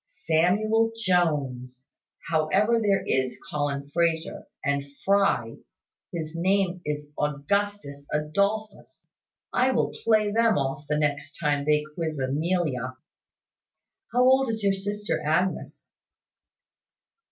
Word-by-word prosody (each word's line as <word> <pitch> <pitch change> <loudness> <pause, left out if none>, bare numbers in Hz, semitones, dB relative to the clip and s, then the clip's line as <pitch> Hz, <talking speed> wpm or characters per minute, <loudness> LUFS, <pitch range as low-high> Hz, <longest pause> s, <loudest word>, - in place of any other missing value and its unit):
"Samuel 215 - +1
Jones. 140 - 0 0.4
However, 180 +9 +2
there 200 -2 +2
is 130 -1 0
Colin 145 -1 -2
Frazer 165 -1 0 0.2
and 140 -1 +1 0.2
Fry, 195 - +2 0.5
his 160 -2 -5
name 185 +1 +1
is 150 0 -3
Augustus 150 0 -2
Adolphus; 200 +8 -2 0.5
I 255 +1 +3
will - - 0
play 215 -2 +3
them 230 -1 +3
off 140 +1 -2
the 150 - +1
next 145 -1 -2
time 145 -3 0
they 150 0 +3
quiz 160 -2 -3
Amelia. 135 -2 -1 1.1
How 245 +1 +3
old 265 0 +4
is 220 -2 -3
your 200 -1 +3
sister 205 +2 -3
Agnes?" 165 +5 -1
165 Hz, 105 wpm, -26 LUFS, 145-205 Hz, 1.1 s, old